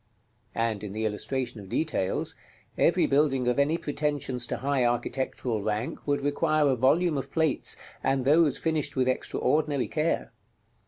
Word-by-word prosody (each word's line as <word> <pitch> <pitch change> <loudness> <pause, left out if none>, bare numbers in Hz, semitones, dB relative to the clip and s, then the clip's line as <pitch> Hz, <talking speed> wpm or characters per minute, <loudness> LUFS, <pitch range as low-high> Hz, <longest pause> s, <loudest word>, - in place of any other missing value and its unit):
And 115 -3 -1
in 100 -2 -5
the 110 +1 -2
illustration 120 +3 -2
of 95 - -12
details, 150 -11 -1 0.4
every 175 +1 +3
building 135 -3 +2
of 125 +2 +1
any 150 +4 +2
pretensions 145 -5 -2
to - - -3
high 140 -1 0
architectural 120 -1 -1
rank 110 +7 -3
would 145 0 +1
require 150 +1 +2
a 130 - +2
volume 150 +5 +2
of - - -7
plates, 160 -4 +2 0.3
and 135 -1 +1
those 150 0 +4
finished 155 -3 -1
with 130 -1 +1
extraordinary 140 +2 0
care. 155 - -1
135 Hz, 150 wpm, -27 LUFS, 120-150 Hz, 0.4 s, those